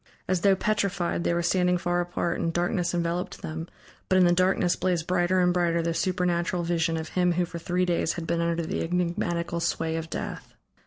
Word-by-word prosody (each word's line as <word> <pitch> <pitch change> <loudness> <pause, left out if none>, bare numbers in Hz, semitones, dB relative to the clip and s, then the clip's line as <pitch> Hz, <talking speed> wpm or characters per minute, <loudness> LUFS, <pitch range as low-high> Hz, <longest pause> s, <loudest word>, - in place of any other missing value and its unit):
As 185 -2 +1
though 195 0 +5
petrified, 195 -4 0
they - - +1
were 175 - 0
standing 180 0 +2
far 175 0 0
apart, 175 0 -2
and 165 - 0
darkness 175 +1 0
enveloped 170 +1 -2
them, 160 +1 -5 0.4
but 185 - +4
in 185 - +6
the 175 - +4
darkness 185 0 +2
blazed 175 -3 0
brighter 180 +1 +2
and 180 0 +3
brighter 170 -1 +1
the 165 0 0
supernatural 175 -1 0
vision 165 -1 0
of 160 0 -5
him 180 -1 +2
who 180 +1 +1
for 170 0 -7
three 180 +2 0
days 170 -2 0
had 170 - -5
been 170 0 0
under 170 0 0
the - - -2
enigmatical 170 0 -1
sway 165 -1 -1
of 160 0 -5
death. - - -6
175 Hz, 205 wpm, -26 LUFS, 170-180 Hz, 0.4 s, in